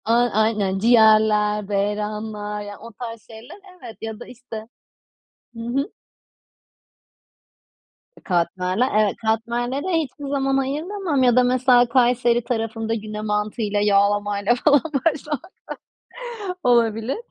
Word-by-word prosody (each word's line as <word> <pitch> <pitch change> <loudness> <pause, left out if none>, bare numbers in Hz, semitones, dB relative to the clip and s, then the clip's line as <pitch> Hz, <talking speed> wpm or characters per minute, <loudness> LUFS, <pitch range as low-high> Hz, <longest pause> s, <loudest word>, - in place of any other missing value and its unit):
A, 225 - +2 0.2
aynen. 210 -3 +1
Ciğerler, 215 -2 +4
beyranlar... 210 +1 -3
Yani, 205 -1 -8
o 230 +1 -11
tarz 230 0 -8
şeyler, 225 - -12 0.2
evet. 225 - -10
Ya 220 -1 -6
da, - - -9
işte 230 -3 -9 0.9
Hı 230 - -9
hı. 250 +5 -2 2.3
E, - - -16
katmerler, 180 +6 0
evet, 210 -2 +2
katmerlere 240 +6 -1 0.2
hiçbir 290 0 -9
zaman 270 -1 0
ayıramam 300 +3 -1
ya 245 -2 +4
da 250 - +5
mesela 250 -1 +4
Kayseri 240 -1 +2
tarafında 225 -1 -2
güne 215 -1 -5
mantıyla 210 0 -1
yağlamayla 205 +1 +2
falan 285 +2 +4 0.2
başlamak 305 +3 -2 1.1
Olabilir. 230 0 +2
225 Hz, 110 wpm, -22 LUFS, 210-250 Hz, 2.3 s, da